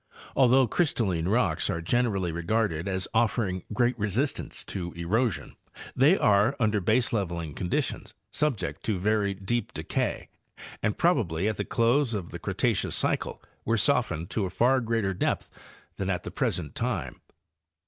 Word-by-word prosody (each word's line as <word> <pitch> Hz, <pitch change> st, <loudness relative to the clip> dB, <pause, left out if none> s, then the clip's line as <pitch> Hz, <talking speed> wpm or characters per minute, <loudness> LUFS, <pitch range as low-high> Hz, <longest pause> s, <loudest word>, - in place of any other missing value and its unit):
Although 130 Hz, -1 st, +5 dB
erystalline 100 Hz, -, 0 dB
rocks 120 Hz, -1 st, +1 dB
are 85 Hz, -5 st, -1 dB
generally 95 Hz, -1 st, 0 dB
regarded 85 Hz, 0 st, -1 dB
as 95 Hz, -1 st, 0 dB
offering 110 Hz, -5 st, +1 dB
great 120 Hz, +3 st, +2 dB
resistance 105 Hz, +8 st, -2 dB
to 85 Hz, -3 st, -5 dB
erosion, 105 Hz, +7 st, -1 dB, 0.4 s
they 150 Hz, +9 st, +5 dB
are, 105 Hz, +6 st, +3 dB
under 105 Hz, -3 st, +2 dB
baseleveling 95 Hz, -7 st, 0 dB
conditions, 90 Hz, -1 st, -2 dB, 0.2 s
subject 110 Hz, -, -1 dB
to 105 Hz, -4 st, 0 dB
very 100 Hz, +1 st, +1 dB
deep 100 Hz, +4 st, -2 dB
decay -, -, -2 dB, 0.5 s
and 105 Hz, -1 st, 0 dB
probably 105 Hz, -, +1 dB
at 110 Hz, -, -1 dB
the -, -, -2 dB
close 120 Hz, +1 st, +2 dB
of 95 Hz, -5 st, -5 dB
the -, -, -6 dB
Cretaceous -, -, 0 dB
cycle -, -, -1 dB, 0.2 s
were -, -, +1 dB
softened 80 Hz, +3 st, +1 dB
to 105 Hz, -, 0 dB
a -, -, -3 dB
far 125 Hz, +8 st, +3 dB
greater 115 Hz, -4 st, 0 dB
depth 90 Hz, -, -1 dB, 0.5 s
than 95 Hz, 0 st, -2 dB
at 90 Hz, -2 st, -1 dB
the -, -, -6 dB
present 75 Hz, -5 st, -2 dB
time. 105 Hz, -, -3 dB
105 Hz, 145 wpm, -27 LUFS, 90-120 Hz, 0.5 s, Although